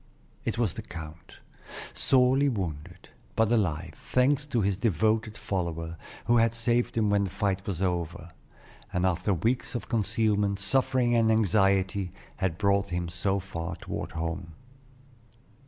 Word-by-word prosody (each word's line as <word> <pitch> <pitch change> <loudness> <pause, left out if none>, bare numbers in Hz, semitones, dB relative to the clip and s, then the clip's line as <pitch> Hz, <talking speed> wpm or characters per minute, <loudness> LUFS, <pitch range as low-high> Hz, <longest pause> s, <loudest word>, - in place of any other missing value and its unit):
It - - -1
was 115 -7 +1
the 110 - -6
count, 80 -5 -10 0.6
sorely 130 +2 +4
wounded, 85 - -5 0.3
but 110 0 +2
alive, 90 -7 0
thanks 140 +3 +1
to 120 -5 0
his 100 -1 +1
devoted 110 +2 +1
follower, 85 -3 -3 0.3
who 120 +1 +4
had 115 0 +3
saved 120 +1 +1
him 105 -2 +2
when 100 -1 +3
the - - -4
fight 95 0 -1
was 95 -2 -2
over; 85 -1 -2 0.6
and 90 0 0
after 90 +2 +1
weeks 115 +9 0
of 120 - -4
concealment, 105 -3 +1
suffering, 125 +3 +2
and 115 -1 +4
anxiety, 100 -3 +2 0.3
had 90 -3 -1
brought 100 0 +2
him 85 -1 -2
so 95 +3 0
far 85 -2 -5
toward - - -6
home. 80 +1 -4
100 Hz, 140 wpm, -28 LUFS, 90-115 Hz, 0.6 s, sorely